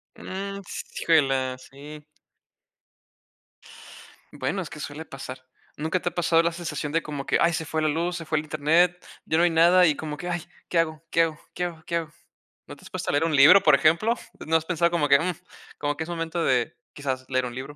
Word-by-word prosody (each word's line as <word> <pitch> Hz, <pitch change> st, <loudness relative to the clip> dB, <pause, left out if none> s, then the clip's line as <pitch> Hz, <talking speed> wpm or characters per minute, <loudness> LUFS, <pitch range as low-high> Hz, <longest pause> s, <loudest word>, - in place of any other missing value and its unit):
Mm, 195 Hz, +1 st, -6 dB, 0.4 s
híjole, 135 Hz, -5 st, +1 dB
sí. 150 Hz, +2 st, -11 dB, 2.3 s
Bueno, 195 Hz, -, -2 dB
es 170 Hz, -, -7 dB
que 150 Hz, -, -10 dB
suele 145 Hz, +2 st, -6 dB
pasar. 130 Hz, -2 st, -8 dB, 0.4 s
Nunca 160 Hz, +4 st, -1 dB
te 175 Hz, -, -1 dB
ha -, -, -20 dB
pasado 165 Hz, -1 st, +3 dB
la 170 Hz, -, +1 dB
sensación 155 Hz, -4 st, -4 dB
de 165 Hz, +2 st, +1 dB
como 145 Hz, -2 st, -6 dB
que: -, -, +2 dB
"Ay, 170 Hz, 0 st, +3 dB
se 160 Hz, -1 st, -2 dB
fue 160 Hz, 0 st, -2 dB
la 155 Hz, -, +2 dB
luz, 170 Hz, +3 st, -1 dB
se 165 Hz, -, -7 dB
fue 155 Hz, 0 st, 0 dB
el 150 Hz, -, -1 dB
internet, 165 Hz, +4 st, +2 dB, 0.2 s
ya 160 Hz, -, +1 dB
no 170 Hz, -, +4 dB
hay 175 Hz, -, +5 dB
nada". 175 Hz, +2 st, +5 dB
Y 150 Hz, -, +2 dB
como 150 Hz, -1 st, -6 dB
que: 175 Hz, -, -5 dB
"Ay, 175 Hz, -1 st, -2 dB, 0.2 s
¿qué 175 Hz, -, -1 dB
hago? 160 Hz, -1 st, -1 dB
¿Qué 165 Hz, -, +3 dB
hago? 160 Hz, -1 st, -3 dB
¿Qué 180 Hz, -, -3 dB
hago? 165 Hz, -2 st, -7 dB
¿Qué 170 Hz, -, -2 dB
hago?". 160 Hz, -2 st, -2 dB, 0.6 s
¿No -, -, -9 dB
te -, -, -20 dB
has -, -, -12 dB
puesto -, -, -4 dB
a -, -, +2 dB
leer 145 Hz, +3 st, +2 dB
un 160 Hz, -2 st, +1 dB
libro, 150 Hz, +9 st, +8 dB
por 150 Hz, -2 st, +6 dB
ejemplo? 170 Hz, +11 st, +3 dB, 0.3 s
¿No 160 Hz, -, +2 dB
has 160 Hz, -, -5 dB
pensado 170 Hz, -1 st, +1 dB
como 165 Hz, -4 st, +1 dB
que, 140 Hz, -, +7 dB
mm, 180 Hz, +2 st, -1 dB, 0.4 s
como 145 Hz, 0 st, -1 dB
que 160 Hz, -, -2 dB
es 160 Hz, -, -10 dB
momento 165 Hz, 0 st, -2 dB
de 125 Hz, -2 st, +1 dB, 0.2 s
quizás 130 Hz, -2 st, -4 dB
leer 130 Hz, -1 st, +1 dB
un 120 Hz, -, -6 dB
libro 135 Hz, +3 st, -7 dB
160 Hz, 225 wpm, -25 LUFS, 145-170 Hz, 2.3 s, libro